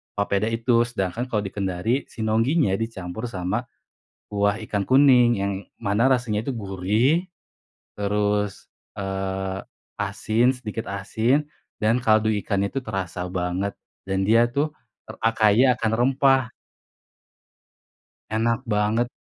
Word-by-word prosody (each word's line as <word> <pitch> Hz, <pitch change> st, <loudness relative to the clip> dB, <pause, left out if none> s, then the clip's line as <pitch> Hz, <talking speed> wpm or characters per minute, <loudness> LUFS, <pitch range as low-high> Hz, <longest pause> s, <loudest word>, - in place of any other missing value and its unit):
papeda 100 Hz, 0 st, 0 dB
itu. 115 Hz, +1 st, +2 dB
Sedangkan, 115 Hz, +1 st, -3 dB
kalau 105 Hz, -5 st, -1 dB
di 95 Hz, -, -5 dB
Kendari, 100 Hz, +6 st, -1 dB
sinongginya 115 Hz, -, +1 dB
dicampur 110 Hz, -1 st, -5 dB
sama 95 Hz, -4 st, -2 dB, 0.6 s
kuah 100 Hz, +1 st, 0 dB
ikan 100 Hz, -1 st, -1 dB
kuning. 125 Hz, -4 st, +5 dB
Yang 100 Hz, 0 st, 0 dB, 0.3 s
mana 115 Hz, +4 st, +2 dB
rasanya 115 Hz, -4 st, 0 dB
itu -, -, +1 dB
gurih, 110 Hz, -, +1 dB, 0.7 s
terus, 105 Hz, 0 st, 0 dB, 0.3 s
eee, 95 Hz, -1 st, -3 dB, 0.4 s
asin 110 Hz, +5 st, +1 dB
sedikit 115 Hz, -3 st, -6 dB
asin, 110 Hz, +8 st, 0 dB, 0.4 s
dan 110 Hz, +3 st, +2 dB
kaldu 110 Hz, -2 st, +3 dB
ikannya 100 Hz, -1 st, -1 dB
itu 135 Hz, -, -1 dB
terasa 95 Hz, -6 st, -4 dB
banget. 90 Hz, +2 st, -2 dB, 0.3 s
Dan, 95 Hz, 0 st, 0 dB
dia 115 Hz, +2 st, +5 dB
tuh 145 Hz, +5 st, -1 dB, 0.4 s
r -, -, -13 dB
a 115 Hz, -, +2 dB
kaya 115 Hz, +4 st, +4 dB
akan 110 Hz, -3 st, -1 dB
rempah. 135 Hz, +1 st, +4 dB, 2.0 s
Enak 115 Hz, +1 st, +1 dB
banget. 105 Hz, +3 st, +1 dB
110 Hz, 120 wpm, -24 LUFS, 100-120 Hz, 2.0 s, kuning